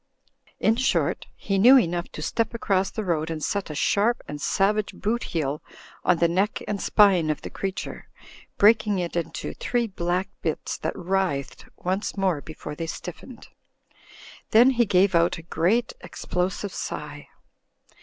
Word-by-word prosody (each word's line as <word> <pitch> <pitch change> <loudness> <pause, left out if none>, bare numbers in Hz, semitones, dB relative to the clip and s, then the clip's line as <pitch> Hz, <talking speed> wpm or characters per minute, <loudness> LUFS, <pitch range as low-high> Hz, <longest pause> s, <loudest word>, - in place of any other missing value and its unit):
In 225 +1 +3
short, 260 - 0
he 195 -1 -1
knew 250 +7 +8
enough 175 -6 0
to 155 - -6
step 230 +8 -1
across 195 -4 +1
the 220 - -4
road 165 -4 -1
and 160 -2 -4
set 200 -4 -2
a 150 - -5
sharp 210 +9 +1
and 145 0 -6
savage 205 +4 +1
boot 235 +3 -2
heel 150 -3 -2 0.4
on 180 - +3
the 170 - +3
neck 190 +5 0
and 205 -2 -2
spine 190 -7 +4
of 155 - -2
the - - -7
creature, 195 -1 -5 0.5
breaking 210 -1 +4
it 175 -2 -3
into 165 -1 -3
three 240 -1 -1
black 180 -2 -2
bits 160 - -2
that - - -3
writhed 180 -7 -2
once 190 +3 -2
more 185 -6 +1
before 155 -1 -8
they 165 +2 -5
stiffened. 180 +9 -8 1.0
Then 240 +4 +6
he 240 -3 +2
gave 190 +1 +3
out 170 +1 +3
a 165 - -10
great 185 +9 +1
explosive 185 +2 -3
sigh. 150 0 -6
185 Hz, 155 wpm, -25 LUFS, 165-210 Hz, 1.0 s, knew